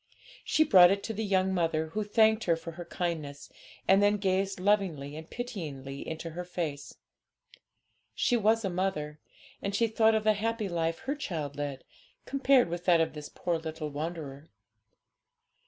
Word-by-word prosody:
She 310 - +3
brought 185 - +8
it 200 +1 0
to 225 - -3
the 220 +1 -3
young 190 -2 +1
mother, 160 -3 0
who 215 +6 -2
thanked 220 +1 +3
her 170 - +3
for 165 +1 -8
her 175 +2 -8
kindness, 160 -5 -4 0.4
and 195 +1 +5
then 205 +1 +4
gazed 195 -1 0
lovingly 180 -8 0
and 160 +1 -9
pityingly 150 - -6
into 160 +1 -5
her 175 +3 -5
face. 165 -5 -5 1.2
She 245 - +2
was 225 0 +2
a - - 0
mother, 155 -5 -2 0.4
and 200 0 -2
she 230 - +3
thought 220 0 +3
of 215 - +1
the 215 0 +4
happy 220 0 -2
life 165 -2 -2
her 265 +2 -2
child 160 - -4
led, 145 -2 -4 0.4
compared 270 -3 +3
with 175 +1 -5
that 175 -2 +5
of 165 - +1
this 150 -1 -8
poor 175 -2 -2
little 160 -1 -5
wanderer. 150 -1 -6
175 Hz, 170 wpm, -29 LUFS, 160-210 Hz, 1.2 s, brought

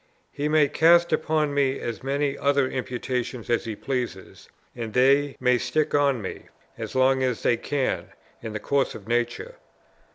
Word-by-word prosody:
He 145 +1 -2
may 155 -1 +4
cast 170 +3 +4
upon 155 -2 +1
me 135 -1 +1
as 115 -4 -5
many 140 +1 -1
other 140 -1 +2
imputations 125 -2 -4
as 120 0 +1
he 110 -2 -4
pleases, 120 -6 -5 0.3
and 115 -2 -5
they 135 +2 +3
may 125 -1 +3
stick 155 +4 -1
on 140 -6 +2
me, 95 - -7 0.3
as - - -7
long 130 0 +3
as 125 -3 -1
they - - +3
can, 135 +3 -2 0.4
in 110 -2 -6
the 105 - -3
course 140 +5 0
of 100 - -11
nature. 120 0 -2
130 Hz, 165 wpm, -25 LUFS, 120-145 Hz, 0.4 s, may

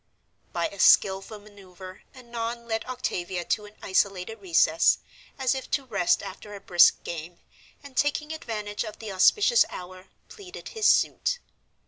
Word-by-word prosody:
By 170 -1 -1
a 200 - -13
skillful 195 +3 +4
maneuver 190 -3 -13
Annon 235 -1 -6
led 225 -1 -2
Octavia 185 -8 -4
to 210 - -1
an 210 +1 -15
isolated 195 +2 0
recess, 360 -3 +3 0.4
as 265 -1 +1
if 265 -1 -6
to 275 - -1
rest 200 -8 +1
after 200 +1 -9
a - - -8
brisk 175 -3 +4
game, 170 +1 -7 0.5
and, 280 -2 -13
taking 295 +2 0
advantage 210 -8 -4
of 215 -2 -8
the 220 -2 -7
auspicious 415 - +5
hour, 185 +1 -10 0.2
pleaded 390 -4 -11
his 440 -2 0
suit. - - +2
210 Hz, 145 wpm, -26 LUFS, 185-255 Hz, 0.5 s, auspicious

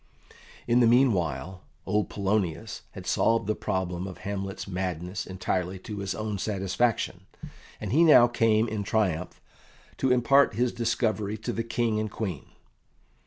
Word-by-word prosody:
In 120 +1 +4
the 120 - +5
meanwhile, 95 - +2 0.2
old 105 +2 0
Polonius 100 -1 -2
had - - -9
solved 115 -1 +2
the 110 - +1
problem 95 -2 -3
of 95 - -8
Hamlet's 100 0 -5
madness 90 -1 -4
entirely 95 0 -2
to 105 +2 -7
his 100 -1 -3
own 105 -2 -3
satisfaction, 95 -1 -1 0.5
and - - -5
he 155 +7 +5
now 150 -7 +8
came 115 -2 +2
in 110 -1 -3
triumph 95 -5 -1 0.6
to 130 - +1
impart 125 0 +4
his 120 +2 +1
discovery 110 -3 -1
to 110 - -4
the 115 - -1
King 115 -1 0
and 110 0 -2
Queen. 95 -8 -4
105 Hz, 145 wpm, -27 LUFS, 95-115 Hz, 0.6 s, now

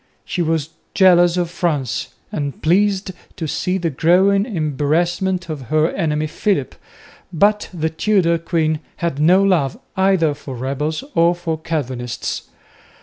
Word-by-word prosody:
She 180 - -2
was 160 -2 0 0.3
jealous 175 -2 +5
of 175 -2 -1
France, 155 -8 -2 0.2
and 140 -2 -4
pleased 195 +3 +2 0.2
to 160 - -4
see 160 +5 -1
the 170 -3 -1
growing 190 - +3
embarrassment 170 - 0
of 140 -7 -6
her 155 +1 +2
enemy 155 -4 -1
Philip, 165 -2 -1 0.6
but 205 +5 +2
the 160 -3 -2
Tudor 170 -1 +2
queen 160 -2 0 0.2
had 170 -5 -3
no 180 +6 +5
love 170 -9 +1 0.2
either 190 -5 +3
for 135 -2 -8
rebels 140 - -3
or 170 +1 +3
for 165 -2 -3
Calvinists. 130 -7 -4
165 Hz, 135 wpm, -19 LUFS, 150-185 Hz, 0.6 s, jealous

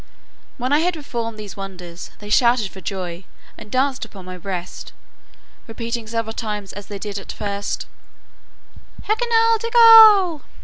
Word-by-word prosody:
When 255 +2 -1
I 295 - +4
had 350 +2 0
performed 235 -7 -5
these 210 -2 -9
wonders, 180 -3 -9
they 210 0 -10
shouted 235 -3 +3
for 190 - -12
joy, 180 -1 -5 0.3
and - - -12
danced 260 +2 0
upon 200 -4 -10
my 185 0 -8
breast, 180 -1 -7 0.7
repeating 230 0 -5
several 230 0 -3
times 210 -3 -5
as 205 0 -9
they 205 - -6
did 205 0 -5
at 195 - -9
first, 200 -1 -4 1.2
Hekinah 455 +1 +2
degul. 445 - +7
225 Hz, 140 wpm, -20 LUFS, 195-300 Hz, 1.2 s, degul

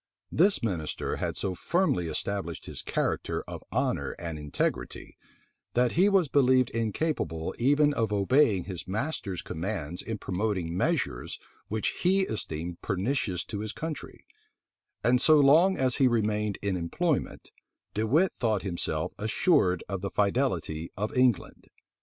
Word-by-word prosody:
This 175 - +3
minister 85 -9 -2
had - - -3
so 95 - -2
firmly 125 - 0
established 85 +1 -3
his - - -7
character - - -1
of - - -7
honor - - 0
and 85 -3 -6
integrity, 75 -1 -3 0.6
that 125 0 +3
he 190 +5 +4
was 195 -5 +3
believed 130 -3 +3
incapable 110 - -2
even 145 +4 +4
of 115 -6 0
obeying 105 -1 +3
his 90 -4 -7
master's 100 - -3
commands 90 -1 -4
in 115 -1 -4
promoting 95 -4 -2
measures - - -1 0.3
which 110 0 -1
he 190 +2 +4
esteemed 85 - -3
pernicious 100 -2 -1
to 105 - -5
his 110 +1 -4
country; 160 -2 -6 0.8
and 125 +1 +4
so 155 -1 +6
long 160 +7 +5
as 130 -2 +1
he 135 - +5
remained 105 -3 0
in 100 -2 0
employment, 135 - -2 0.4
De 110 +1 0
Wit 165 - +3
thought 110 -5 +1
himself 90 -3 -2
assured 110 - +2
of 95 -2 -4
the 100 - -2
fidelity 95 - 0
of 105 +8 -3
England. 125 -5 +1
110 Hz, 140 wpm, -28 LUFS, 90-140 Hz, 0.8 s, so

